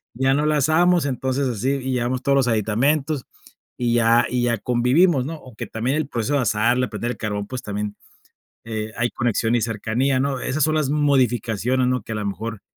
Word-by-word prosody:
ya 130 +3 +2
no 145 +1 +1
la 155 0 +2
asamos, 165 +2 +3
entonces 130 +1 -1
así 125 +3 -1
y 130 -1 -2
llevamos 125 +1 -1
todos 140 +1 +2
los 130 -3 +2
aditamentos 130 +7 +1 0.5
y 120 -1 0
ya 115 0 +4
y 125 -1 0
ya 120 -2 +1
convivimos, 125 - +2
¿no? 160 - -4
Aunque 130 -7 -9
también 125 +6 -1
el 155 -3 -1
proceso 120 +2 -2
de 140 - +2
asarla, 120 +3 +1
prender 120 +1 -3
el - - -7
carbón, 105 -2 -3
pues 130 -1 -5
también, 105 0 -4 0.7
eh, 110 -1 -4
hay 120 0 0
conexión 120 0 0
y 120 - +2
cercanía, 115 +4 0
¿no? 135 -2 -1
Esas 140 +2 0
son 155 0 +1
las 150 -3 +1
modificaciones, 125 -4 +1
¿no? 125 -2 0
Que 110 - -7
a - - -2
lo 105 - -3
mejor 110 +1 -5
125 Hz, 200 wpm, -22 LUFS, 115-140 Hz, 0.7 s, ya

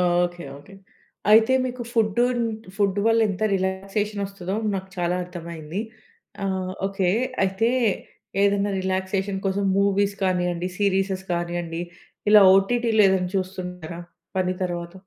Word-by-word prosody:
Okay 175 0 +1
okay. 145 +8 -14 0.6
అయితే 220 +3 +6
మీకు 250 -1 -4
food, 220 -2 +1 0.6
food 200 -2 +1
వల్ల 225 0 +4
ఎంత 190 +2 -5
రిలాక్సేషన్ 195 +2 -2
వస్తదో, 195 -1 -5 0.2
నాకు 190 0 -4
చాలా 175 0 +1
అర్థమైంది. 170 0 -6 0.6
ఆహ్, 190 -1 -2
ఓకె. 195 -2 0 0.3
అయితే 195 +5 +1 0.7
ఏదైనా 200 0 +2
రిలాక్సేషన్ 190 +1 -1
కోసం 195 +1 0
మూవీస్ 200 0 +2
కానియండి, 180 -1 0
సీరీసెస్ 195 -1 0
కానియండి 170 -1 -2 0.5
ఇలా 210 -1 +9
ఓటీటీలో 225 +2 +3
ఏదైనా 185 -1 +1
చూస్తుంటారా 180 -3 -5 0.4
పని 185 -1 +1
తర్వాత? 175 -1 -4
190 Hz, 115 wpm, -24 LUFS, 180-200 Hz, 0.7 s, ఇలా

